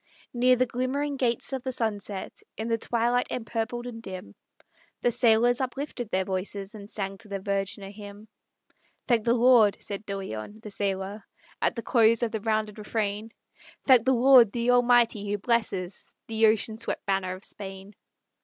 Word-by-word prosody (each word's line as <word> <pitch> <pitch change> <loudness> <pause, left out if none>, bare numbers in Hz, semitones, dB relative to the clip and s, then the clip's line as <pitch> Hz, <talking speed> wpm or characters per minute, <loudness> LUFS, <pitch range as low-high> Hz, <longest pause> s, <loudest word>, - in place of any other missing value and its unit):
Near 250 +1 +4
the 255 +1 +2
glimmering 260 +4 -2
gates 250 0 -1
of 265 - -2
the 260 - -3
sunset, 205 -5 -4 0.2
In 220 +1 -3
the 230 0 +1
twilight 240 +2 +1
empurpled 235 +1 -3
and 230 -2 -7
dim, 185 - -8 0.7
The 245 - +2
sailors 240 +2 +4
uplifted 260 -2 -4
their 190 -1 0
voices, 195 +2 -4
And 205 -1 -10
sang 195 -2 -4
to 230 - -11
the 200 -1 -3
Virgin 195 0 -2
a 195 - -8
hymn. 205 +1 -11 0.8
"Thank 235 -4 +2
the 235 0 +3
Lord!" 235 -4 +5
said 200 0 -5
De 200 0 -3
Leon, 195 - -7
the 210 - -8
sailor, 195 +1 -3 0.4
At - - +1
the 230 - -5
close 230 -1 +3
of 230 - 0
the 220 - -3
rounded 215 -1 -1
refrain; 210 0 -2 0.6
"Thank 255 -4 +6
the 265 - +4
Lord, 250 -3 +7
the 240 +2 +1
Almighty, 240 -4 +3
who 205 - 0
blesses 200 -5 -2
The 225 0 +3
ocean 220 0 +1
swept 235 - -4
banner 190 -2 -1
of 185 - -13
Spain! 195 0 -9
220 Hz, 175 wpm, -27 LUFS, 200-240 Hz, 0.8 s, Lord